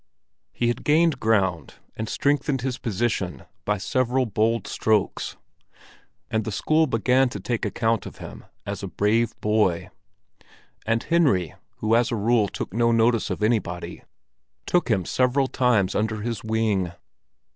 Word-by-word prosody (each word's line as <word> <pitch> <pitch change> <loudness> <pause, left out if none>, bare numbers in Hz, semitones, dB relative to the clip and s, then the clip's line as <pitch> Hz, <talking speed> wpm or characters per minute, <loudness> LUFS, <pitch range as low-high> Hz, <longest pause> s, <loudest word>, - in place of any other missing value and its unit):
He 120 - -1
had 120 +1 -3
gained 155 -2 +3
ground, 95 -6 0 0.2
and 110 0 -4
strengthened 140 -2 0
his 130 0 -3
position 110 -5 -2 0.2
by 105 0 +1
several 130 +4 0
bold 115 +1 0
strokes; 110 -3 0 0.9
and 110 0 0
the 110 - -4
school 155 +9 +2
began 125 +2 +2
to 105 - -6
take 115 +4 -2
account 115 +2 0
of - - -11
him - - -10 0.2
as - - -4
a - - -4
brave 115 +3 0
boy. 105 -5 +1 1.0
And 115 0 +1
Henry, 135 - +2 0.3
who 110 +1 +3
as 120 +1 +2
a - - 0
rule 110 0 +2
took 95 - -6
no 115 +1 +2
notice 115 0 +2
of - - -3
anybody, 105 -6 -1 0.6
took 175 -5 +1
him 95 -6 +1
several 130 +5 +2
times 120 -7 +1
under 110 0 -1
his 115 -2 -4
wing. 110 -5 0
115 Hz, 145 wpm, -24 LUFS, 105-125 Hz, 1.0 s, gained